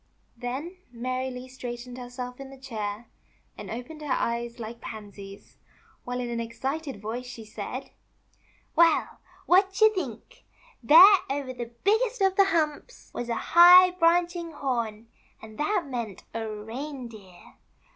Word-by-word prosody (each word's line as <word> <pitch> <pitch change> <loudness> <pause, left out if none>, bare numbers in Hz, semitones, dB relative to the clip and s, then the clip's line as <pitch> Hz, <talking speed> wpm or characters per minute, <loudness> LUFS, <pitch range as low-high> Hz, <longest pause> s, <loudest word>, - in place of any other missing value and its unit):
Then 265 +9 -5
Mary 255 +2 -3
Lee 250 0 -8
straightened 250 -1 -8
herself 250 0 -7
in 275 -1 -8
the 270 - -12
chair 220 -4 -5 0.5
and - - -9
opened 250 +7 -7
her 295 -3 -5
eyes 235 0 -1
like 230 +1 -7
pansies, 200 -2 -10 0.5
while, 245 0 -3
in 245 - -3
an 235 -1 -3
excited 265 +3 -4
voice, 230 +4 -5
she 230 -3 -9
said: 245 +5 -7 0.8
"Well! 335 0 +3 0.3
What 380 +2 +3
you 435 0 +6
think! 370 - -6 0.4
There, 350 - +9
over 275 -2 -3
the 240 -1 -8
biggest 445 +4 +2
of 385 -1 +2
the 395 - +6
humps, 330 +4 -2
was 240 - -5
a 235 - 0 0.2
high, 360 +2 +9
branching 345 -1 +1
horn 235 -6 -3 0.2
— - - -35
and 220 -1 -13
that 360 +4 +1
meant 235 -7 -5
a 225 -1 -3
reindeer. 220 -4 -9
255 Hz, 145 wpm, -27 LUFS, 235-330 Hz, 0.8 s, There